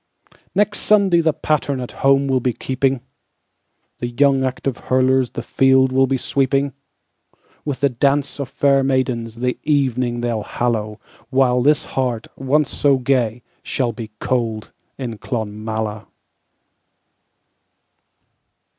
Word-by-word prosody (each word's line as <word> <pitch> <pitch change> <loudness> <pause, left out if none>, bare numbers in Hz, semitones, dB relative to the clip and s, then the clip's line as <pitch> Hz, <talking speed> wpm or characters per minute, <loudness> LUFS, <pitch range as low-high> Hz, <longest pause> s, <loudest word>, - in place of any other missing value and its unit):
Next 205 +1 +2
Sunday 195 -5 +4
the 160 -1 +3
patternAt 140 -4 -1
home 135 0 +4
will 130 -1 +2
be 125 0 0
keeping, 130 +3 0
And 130 - -7 1.0
the 120 - -2
young 135 +2 +2
active 130 0 -2
hurlersThe 130 -2 +2
field 130 +1 +3
will 135 0 +3
be 135 0 0
sweeping; 135 +1 0 0.9
With 140 -3 -3
the 140 - +4
dance 140 +3 0
of 140 -3 -4
fair 140 -1 +2
maidensThe 125 -2 -1
evening 130 -5 0
they'll 120 -2 -1
hallow, 110 -2 -2 0.3
While 125 -1 +3
this 150 +4 +3
heart, 125 -4 -2
once 140 +2 +1
so 140 -2 +3
gay, 125 -3 0 0.2
Shall 125 -3 -1
be 115 -1 -8
cold 115 -4 -2 0.3
in 120 -5 -5
Clonmala. 110 -2 -4
130 Hz, 120 wpm, -20 LUFS, 120-140 Hz, 1.0 s, Sunday